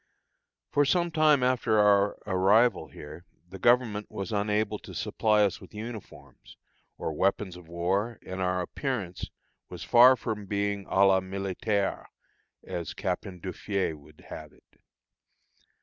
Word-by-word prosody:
For 145 - +3
some 170 +4 +1
time 155 -4 +4
after 125 -3 +2
our 105 -1 +4
arrival 105 +3 +3
here, 75 +3 -11 0.2
the 95 +2 -10
Government 120 -2 +2
was 100 +3 -5
unable 105 0 0
to - - -11
supply 105 -1 +2
us 100 -3 -1
with - - -14
uniforms, 105 - -10 0.4
or 80 - -3
weapons 95 +2 0
of 90 -2 -13
war, 95 +7 -1
and 95 0 -5
our 90 0 0
appearance 100 -3 -4 0.4
was - - -8
far 125 +2 +7
from 110 -5 -5
being 100 0 -2
à 100 +1 +4
la 95 -1 +4
militaire, 95 +2 -2 0.6
as 85 -2 -5
Captain 90 -1 -4
Duffié 95 0 -2
would 75 +1 -18
have 75 -2 -9
it. - - -28
100 Hz, 135 wpm, -28 LUFS, 90-110 Hz, 0.6 s, far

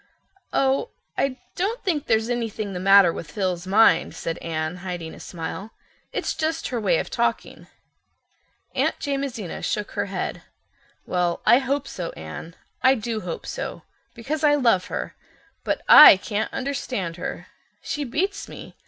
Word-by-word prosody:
"Oh, 270 - +1 0.3
I 265 -2 0 0.2
don't 410 +7 -2
think 315 -7 -1
there's 220 0 +2
anything 225 -4 -3
the 180 - -4
matter 195 -2 +6
with 150 - -7
Phil's 185 -1 -2
mind," 220 +4 +4
said 165 - -4
Anne, 155 +1 -3
hiding 175 -3 -6
a - - -12
smile. 185 +5 -6 0.4
"It's - - -2
just 320 +1 -2
her 240 -3 -2
way - - +3
of - - -3
talking." - - -2 1.1
Aunt - - +1
Jamesina 275 - -3
shook 210 -1 -2
her - - -2
head. 190 -2 -4 0.6
"Well, 175 -1 -1
I 240 - +7
hope 275 +1 -1
so, 175 -2 -5
Anne. 80 - -9 0.3
I 260 +1 +5
do 225 -1 -3
hope 175 -2 -6
so, - - -5 0.3
because 295 +7 -4
I 295 -1 +5
love 235 -10 +3
her. - - -5 0.5
But - - -1
I 300 - +11
can't 205 +2 -3
understand 250 -10 -3
her—she 290 +10 -6
beats 355 +10 -2
me. - - -10
220 Hz, 150 wpm, -24 LUFS, 180-275 Hz, 1.1 s, I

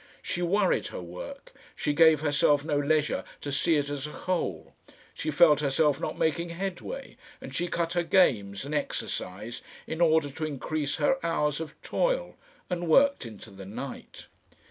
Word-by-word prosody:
She 175 - -2
worried 190 +2 +2
her - - -6
work, 90 0 -9 0.2
she 150 - -1
gave 160 -1 +6
herself 145 -1 +3
no 155 -2 0
leisure 150 +1 +1 0.2
to 145 - -4
see 140 +4 +2
it 145 -1 +1
as 145 0 -3
a - - -8
whole, 125 - -3 0.4
she - - -4
felt 150 -1 +6
herself 150 +1 +2
not - - -3
making 170 +2 0
headway 195 - -5 0.2
and - - -9
she 175 - -1
cut 170 -1 -1
her 175 - +2
games 120 - +2
and 145 - -5
exercise 115 -6 -3 0.2
in 160 +2 -4
order 160 -3 +4
to 155 - -6
increase 145 0 -2
her 265 - +1
hours 150 -3 0
of 160 -2 -7
toil, - - 0 0.3
and 175 -1 -3
worked 275 - +4
into 110 -3 -11
the 95 -1 -10
night. 125 +6 -8
155 Hz, 165 wpm, -28 LUFS, 140-170 Hz, 0.4 s, gave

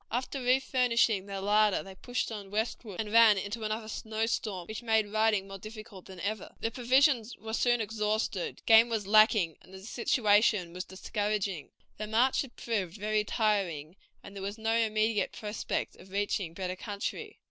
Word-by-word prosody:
After 255 +3 -2
refurnishing 245 -5 +2
their 195 -1 -5
larder 210 0 +3
they 195 - -10
pushed 245 +5 -3
on 205 -3 -7
westward, 215 -1 -3
and 215 -1 -3
ran 225 -2 +7
into 205 +4 -4
another 215 +1 -3
snow 220 0 -3
storm, 205 -5 -3
which 215 +4 -6
made 220 -3 +1
riding 215 -3 +2
more 195 0 -8
difficult 215 -2 -10
than 190 -1 -11
ever. 215 +3 -4
Their 225 - -2
provisions 250 -1 +2
were 220 +2 -7
soon 240 +1 +2
exhausted, 215 -3 -2
game 225 +1 +7
was 220 -3 -2
lacking, 210 -5 +4
and - - -19
the 190 0 -11
situation 210 -6 +2
was 180 0 -5
discouraging. 200 -3 -3 0.3
The 215 - -4
march 235 +5 +2
had 265 -4 -9
proved 205 -5 -3
very 210 +1 0
tiring, 190 -8 -1 0.3
and 200 - -11
there 195 - -6
was 200 +2 -4
no 225 +1 0
immediate 220 -1 +1
prospect 210 -2 -4
of 190 - -15
reaching 195 -3 -2
better 185 0 -3
country. 210 - -5
215 Hz, 170 wpm, -30 LUFS, 195-225 Hz, 0.3 s, ran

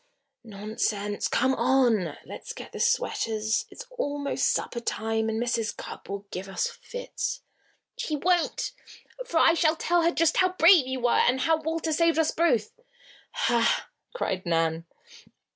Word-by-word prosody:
"Nonsense! 210 -1 -2
Come 260 +2 +2
on! 235 - +2
Let's - - -8
get - - -10
the - - -8
sweaters. 225 - 0
It's 485 - -10
almost 285 - 0
supper 240 - -1
time 225 -1 -1
and 220 0 -2
Mrs. 235 -2 -1
Cupp - - -9
will 200 0 -5
give 190 +2 -6
us 190 - -1
fits." - - -5 0.5
"She 310 - -2
won't, 350 +3 0 0.6
for 340 - -1
I 325 - +6
shall 325 -1 +2
tell 345 +1 +1
her 335 - +3
just 330 -2 +2
how 370 0 +3
brave 335 -5 +6
you 260 -1 -3
were, 240 0 +2
and 255 +2 +3
how 320 +1 +2
Walter 320 0 -2
saved 335 +1 +2
us 320 -1 +2
both." 245 -11 +1 0.6
"Ha!" 235 -1 +1 0.2
cried 190 - -2
Nan. 165 -1 0
260 Hz, 150 wpm, -27 LUFS, 220-330 Hz, 0.6 s, I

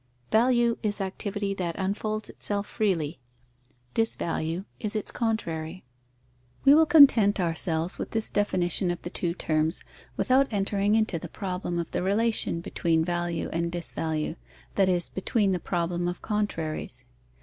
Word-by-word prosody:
Value 235 +1 +3
is 210 -2 -1
activity 195 +1 -2
that 175 -4 -3
unfolds 215 +3 -2
itself 205 -1 -3
freely: 175 -9 -1 0.7
disvalue 175 -5 -1
is 215 0 -3
its 215 - -2
contrary. 185 -7 -2 0.8
We 275 - +9
will 320 +1 +6
content 240 -11 +7
ourselves 165 -1 0
with - - -3
this 225 -1 -1
definition 185 -3 +1
of 175 - -2
the 175 - -5
two 170 -1 -2
terms, 160 -1 0 0.3
without 265 +1 +3
entering 205 0 +1
into 215 -6 +1
the 170 - -8
problem 180 -2 -3
of 170 -1 -3
the - - -1
relation 200 -2 +1
between 165 -1 0
value 175 -1 -1
and 170 +1 -1
disvalue, 160 -2 -3 0.4
that 195 -2 +3
is, 175 -2 +1
between 200 +1 0
the 180 - 0
problem 175 0 -1
of 175 - -4
contraries. 205 -8 -2
190 Hz, 140 wpm, -27 LUFS, 170-215 Hz, 0.8 s, We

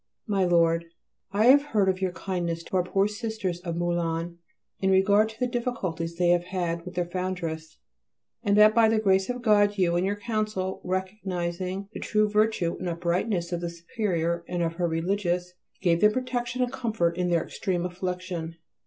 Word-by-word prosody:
MY 195 -4 +1
LORD, 170 -1 +3 0.5
I 205 +3 +2
have 275 +3 +8
heard 215 -9 +1
of 190 0 0
your 190 -1 0
kindness 175 -3 -3
to 190 - -2
our 180 - +3
poor 195 +3 +1
Sisters 210 -4 -3
of 170 -2 -4
Moulins 170 -1 -1 0.4
in 190 - +1
regard 200 +3 +4
to 220 - -13
the 250 - +2
difficulties 215 -10 -3
they 175 0 +2
have 175 0 +3
had 175 -2 -2
with 180 - -8
their 175 0 0
Foundress, 170 -3 -4 0.6
and 205 -2 +2
that 215 0 +7
by 225 -1 +5
the 220 - +2
grace 195 -2 +2
of 250 0 -3
God 205 -2 +4
you 175 -2 +2
and 175 - +2
your 200 +2 0
Council, 210 -3 -2
recognizing 185 0 -3
the - - -6
true 215 -1 +1
virtue 210 -5 +1
and 180 - -3
uprightness 170 +1 -1
of 175 -1 -2
the 170 - -2
Superior 170 -1 -2
and 175 -1 -1
of 165 0 -1
her 175 -1 +1
Religious, 180 +1 -1 0.3
gave 170 -2 +3
them 210 0 +5
protection 250 0 -1
and 250 +1 -3
comfort 220 -10 0
in 180 0 0
their 170 -2 +2
extreme 180 -3 -2
affliction. 180 -2 -4
185 Hz, 185 wpm, -26 LUFS, 170-210 Hz, 0.6 s, have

